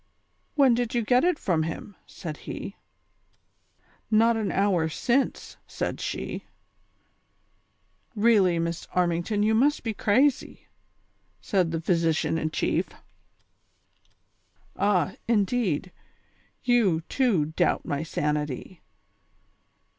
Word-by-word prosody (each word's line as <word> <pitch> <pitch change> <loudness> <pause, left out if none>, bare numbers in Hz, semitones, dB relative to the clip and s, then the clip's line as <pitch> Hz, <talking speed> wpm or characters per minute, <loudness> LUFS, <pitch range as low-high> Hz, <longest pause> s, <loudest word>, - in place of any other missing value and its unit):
" - - -44
When 275 -4 +5
did 240 0 -1
you 235 - +1
get 250 +3 +3
it 355 -2 +2
from 170 -5 0
him? 165 +5 -5
" - - -40
said 155 -4 -5
he. - - -7 0.7
" - - -46 0.6
Not 230 +1 +4
an 220 -3 -1
hour 185 -5 +1
since," 250 - -1
said - - -4
she. - - -4 1.7
"Really, 205 -5 +4
Miss 170 0 -3
Armington, 180 +4 +1
you 220 +1 +3
must 280 +7 +2
be 225 -2 -2
crazy," 255 +8 +1 0.7
said 185 -4 0
the 165 0 -2
physician 165 -1 +1
in 155 - -1
chief. - - -1 1.0
" - - -40
Ah, 190 -2 +1
indeed; 205 -6 0 0.7
you, 220 -10 +3
too, 205 - +1
doubt - - +1
my 145 0 -2
sanity. 150 +1 -3
195 Hz, 115 wpm, -26 LUFS, 165-235 Hz, 1.7 s, When